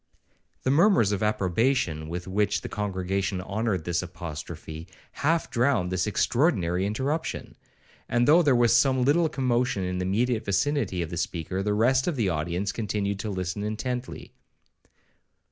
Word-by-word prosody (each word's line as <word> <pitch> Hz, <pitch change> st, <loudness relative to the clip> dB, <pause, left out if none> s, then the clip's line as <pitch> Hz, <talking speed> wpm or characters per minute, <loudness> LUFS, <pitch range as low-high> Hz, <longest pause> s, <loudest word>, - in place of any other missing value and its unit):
The 130 Hz, -, +2 dB
murmurs 165 Hz, -, +4 dB
of 100 Hz, -, -1 dB
approbation 105 Hz, -, 0 dB
with 90 Hz, +2 st, -5 dB
which 100 Hz, +2 st, 0 dB
the -, -, -6 dB
congregation 95 Hz, -1 st, -2 dB
honoured 100 Hz, -1 st, -2 dB
this 85 Hz, 0 st, 0 dB
apostrophe, 80 Hz, -2 st, -7 dB, 0.2 s
half 165 Hz, +3 st, 0 dB
drowned 120 Hz, -8 st, +1 dB
this 95 Hz, +2 st, 0 dB
extraordinary 100 Hz, -, +1 dB
interruption; 135 Hz, +10 st, -3 dB, 0.5 s
and 120 Hz, 0 st, +2 dB
though 160 Hz, +4 st, +7 dB
there 145 Hz, -6 st, +3 dB
was 120 Hz, -1 st, +4 dB
some 130 Hz, +1 st, +3 dB
little 160 Hz, +4 st, +3 dB
commotion 125 Hz, -7 st, 0 dB
in 90 Hz, 0 st, -2 dB
the 90 Hz, -, -1 dB
immediate 115 Hz, +4 st, 0 dB
vicinity 100 Hz, -2 st, 0 dB
of 85 Hz, -, -7 dB
the 85 Hz, -, -4 dB
speaker, 90 Hz, +3 st, -3 dB
the 105 Hz, +1 st, 0 dB
rest 130 Hz, +4 st, +3 dB
of 175 Hz, -, 0 dB
the 110 Hz, -7 st, +1 dB
audience 85 Hz, +4 st, -1 dB
continued 100 Hz, -2 st, -2 dB
to 110 Hz, -, -3 dB
listen 95 Hz, +1 st, -3 dB
intently. 120 Hz, +4 st, -4 dB
105 Hz, 150 wpm, -26 LUFS, 90-125 Hz, 0.5 s, though